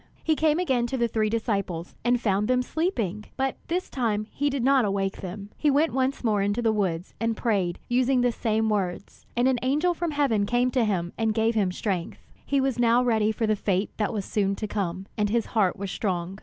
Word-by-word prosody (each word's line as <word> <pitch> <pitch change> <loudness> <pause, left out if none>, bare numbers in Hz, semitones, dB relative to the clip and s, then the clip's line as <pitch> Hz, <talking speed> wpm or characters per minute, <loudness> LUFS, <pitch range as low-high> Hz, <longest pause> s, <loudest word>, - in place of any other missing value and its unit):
He 315 - +2
came 310 0 +2
again 260 -9 +1
to 265 - -2
the 235 -1 +2
three 215 -1 0
disciples, 200 -6 -2
and 245 +1 +2
found 210 -2 +1
them 250 0 +2
sleeping; 230 - -2
but 270 -1 -1
this 360 +2 -1
time 215 -5 -1
he 285 +1 0
did 270 -3 -2
not 270 0 +4
awake 195 -1 -1
them. 200 +2 -7
He 300 - +1
went 295 +4 +2
once 265 +1 0
more 215 -4 +2
into 205 +3 0
the 230 -2 +2
woods, 185 -4 -1
and 230 -1 0
prayed, 195 -7 0
using 255 +1 +2
the 245 0 +3
same 220 -1 0
words. 195 -5 -3
And 245 +2 +4
an 260 -2 +2
angel 300 +7 +2
from 345 0 -2
heaven 270 -9 +1
came 245 +2 +2
to 250 -3 +2
him 175 -5 -1
and 220 -1 +1
gave 225 +1 +2
him 200 -5 +1
strength. 185 -2 -3 0.3
He 280 - +1
was 265 -2 0
now 240 +1 +4
ready 220 -3 +2
for 225 +1 -1
the 215 0 +2
fate 195 -1 -1
that 210 - 0
was 205 -3 -3
soon 200 -2 0
to 215 - -4
come, 190 -3 -3
and 210 -1 +2
his 230 +1 +1
heart 205 -5 +2
was 195 -1 -4
strong. 185 -1 -2
225 Hz, 225 wpm, -26 LUFS, 200-255 Hz, 0.3 s, not